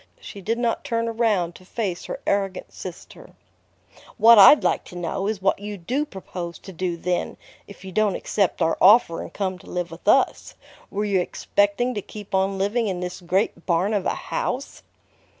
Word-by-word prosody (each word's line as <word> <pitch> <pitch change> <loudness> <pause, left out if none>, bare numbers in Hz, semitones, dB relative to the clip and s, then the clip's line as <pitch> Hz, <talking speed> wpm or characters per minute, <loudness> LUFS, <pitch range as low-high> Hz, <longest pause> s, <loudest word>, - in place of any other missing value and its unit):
She 485 - -10
did 225 +5 -1
not 235 -1 -1
turn 230 -5 -1
around 220 -7 0
to 185 - -15
face 190 -2 -4
her - - -5
arrogant 195 -2 -1
sister. - - -10 0.8
"What 230 0 +8
I'd 290 +9 +9
like - - +1
to - - -12
know 175 +3 -3
is 210 -3 -3
what 195 - +2
you 205 0 -6
do 250 - -2
propose 175 -4 -7
to 190 - -12
do, 175 0 -3
then, 180 +1 -2 0.3
if 200 -1 -13
you 190 - -7
don't 210 0 +1
accept 195 -4 0
our 165 - 0
offer 190 -4 +6
and - - -8
come 190 -2 -3
to - - -15
live 175 -2 -3
with 165 +4 -12
us? 265 +5 +2 0.3
Were 205 +1 -2
you 200 -2 +2
expecting 205 +6 0
to 205 - -3
keep 205 0 -11
on 195 +1 +1
living 210 +4 0
in 185 -3 -2
this 180 +1 -5
great 175 0 -1
barn 180 +4 +1
of 200 -3 0
a - - 0
house?" 280 - -4
195 Hz, 190 wpm, -23 LUFS, 180-220 Hz, 0.8 s, I'd